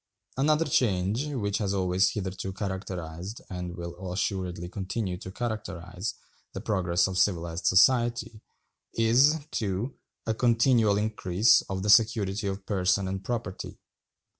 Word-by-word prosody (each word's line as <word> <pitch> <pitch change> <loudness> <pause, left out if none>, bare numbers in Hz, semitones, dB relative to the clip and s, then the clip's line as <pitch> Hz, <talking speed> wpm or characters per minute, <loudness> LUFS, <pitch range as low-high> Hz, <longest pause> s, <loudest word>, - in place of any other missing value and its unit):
Another 150 +4 +2
change, 110 - +1
which 105 -9 -2
has 100 -2 -1
always 95 0 +2
hitherto 95 -1 -4
characterized, 95 -1 -5
and 90 -1 -5
will 85 +2 -6
assuredly 90 -2 -2
continue 95 +1 -3
to 95 - -8
characterize, 95 -4 -4 0.4
the - - -4
progress 90 -5 +1
of 95 -1 -1
civilized 85 -3 0
society, 120 +1 +3 0.5
is 125 +7 +4
(2) 105 +5 -2 0.3
a 110 - 0
continual 115 -2 +3
increase 105 -1 +3
of 95 -1 -3
the 105 - -1
security 105 -3 +3
of 95 0 -4
person 95 -1 +1
and 95 0 -4
property. 110 -4 -4
100 Hz, 125 wpm, -27 LUFS, 90-115 Hz, 0.5 s, is